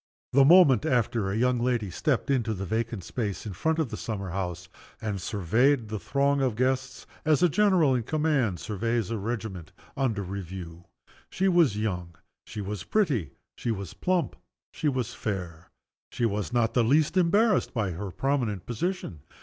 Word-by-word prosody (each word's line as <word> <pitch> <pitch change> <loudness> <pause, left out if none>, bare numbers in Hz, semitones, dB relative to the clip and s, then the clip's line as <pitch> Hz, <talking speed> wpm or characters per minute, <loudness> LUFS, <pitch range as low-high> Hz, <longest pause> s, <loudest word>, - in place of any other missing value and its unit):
The 135 +1 +6
moment 150 -3 +7
after, 120 -7 +1
a 100 - -1
young 125 +1 +2
lady 120 -5 0
stepped 140 - 0
into 115 -5 +1
the 95 +1 -4
vacant 110 -1 -2
space 105 0 -4
in 105 - -5
front 160 - 0
of 160 -6 0
the - - -5
summer 100 -5 -4
house, 90 -1 -4 0.3
and 105 -4 -3
surveyed 110 - +1
the 110 -1 -3
throng 140 +4 +1
of 130 -5 +1
guests 130 +2 -1 0.2
as 155 +2 +3
a 175 - +6
general 180 -6 +3
in 125 - +1
command 135 - 0
surveys 115 +1 -2
a 115 - -2
regiment 100 -6 -5 0.2
under 115 -7 0
review. 90 -2 -7 0.4
She 190 - 0
was 170 - +4
young, 90 -5 -3 0.3
she 105 - -6
was 100 -2 -4
pretty, 140 - 0 0.2
she - - -4
was 100 -6 -3
plump, 180 -2 0 0.4
she 150 - 0
was 130 -4 -2
fair. 90 -5 -5 0.4
She 120 - -1
was 105 -1 -1
not 120 -2 +1
the 120 - +3
least 150 +8 +3
embarrassed 200 +5 +3
by 105 -7 -1
her 95 +4 -5
prominent 120 -4 -1
position. 120 - -3
115 Hz, 170 wpm, -27 LUFS, 100-140 Hz, 0.4 s, moment